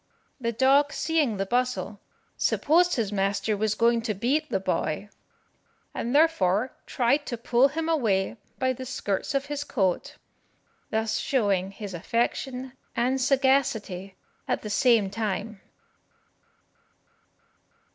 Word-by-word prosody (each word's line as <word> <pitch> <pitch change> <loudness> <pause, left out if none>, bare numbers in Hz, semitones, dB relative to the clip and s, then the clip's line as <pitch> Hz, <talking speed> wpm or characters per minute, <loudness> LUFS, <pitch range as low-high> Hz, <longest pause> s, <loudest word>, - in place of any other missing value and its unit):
The 235 -2 -1
dog 275 +5 +4
seeing 300 -9 0
the 195 - -1
bustle, 245 -2 -1 0.3
supposed 350 +4 +3
his 220 -5 -1
master 200 +2 0
was 215 +1 0
going 235 +1 +3
to 225 -2 -2
beat 280 - 0
the 195 - 0
boy, 185 +1 -2 0.8
and 240 +4 -2
therefore 255 - +3
tried 275 +4 +1
to 240 - -3
pull 240 +3 +3
him 320 +3 -3
away 230 -10 +1 0.2
by 260 -1 +1
the 255 +1 -8
skirts 220 +2 -2
of 275 0 0
his 290 0 -4
coat, 190 -10 -1 0.7
thus 220 0 0
showing 200 -8 +1
his 200 0 -8
affection 250 +7 -2 0.2
and 255 +3 +1
sagacity 255 -8 +1 0.3
at - - -1
the 210 - -5
same 225 -3 +3
time. 215 -1 -3
235 Hz, 125 wpm, -26 LUFS, 205-270 Hz, 0.8 s, dog